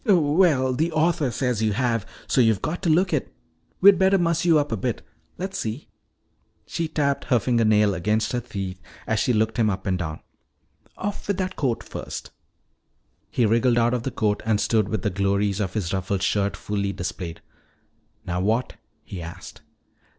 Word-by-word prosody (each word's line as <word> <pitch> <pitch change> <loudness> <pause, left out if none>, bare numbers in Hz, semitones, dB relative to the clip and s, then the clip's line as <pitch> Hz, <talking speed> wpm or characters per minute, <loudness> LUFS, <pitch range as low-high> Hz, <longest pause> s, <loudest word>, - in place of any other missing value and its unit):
"Well, 155 - +3
the 160 +6 0
author 160 -2 +2
says 120 -1 -1
you 110 -1 +1
have, 115 -2 0 0.2
so 130 - +2
you've 110 -5 +2
got 170 +3 -2
to 180 - 0
look 180 +3 +3
it. 150 - -1 0.5
We'd 195 -1 +7
better 190 +1 +4
muss 170 -1 +1
you 165 -3 +5
up 145 -2 0
a - - +1
bit. 100 - -3 0.3
Let's 190 +2 -4
see." 115 +6 -4 0.8
She 165 - -2
tapped 145 -3 0
her 125 - +3
fingernail 110 -3 +3
against 105 +4 0
her 125 - 0
teeth 95 -6 -6 0.2
as - - 0
she - - +2
looked 110 0 +1
him 110 -2 +3
up 95 -1 -3
and 95 -2 0
down. 80 -3 -4 0.8
"Off 205 +1 -4
with 200 -2 0
that 185 -1 -2
coat 125 -5 -1
first." - - -7 1.0
He 120 - +1
wriggled 115 +2 +3
out 120 +1 +3
of 125 - 0
the 135 - -3
coat 105 -4 0
and 110 -1 +1
stood 110 -3 +1
with 110 -4 -2
the 105 - 0
glories 100 +1 0
of 95 -2 -2
his 95 -5 -2
ruffled 95 0 -1
shirt 100 +1 0
fully 100 -1 -2
displayed. 90 -2 -5 0.8
"Now 90 0 -2
what?" 110 +6 0 0.3
he 95 - -7
asked. 85 +1 -9
115 Hz, 180 wpm, -24 LUFS, 100-150 Hz, 1.0 s, We'd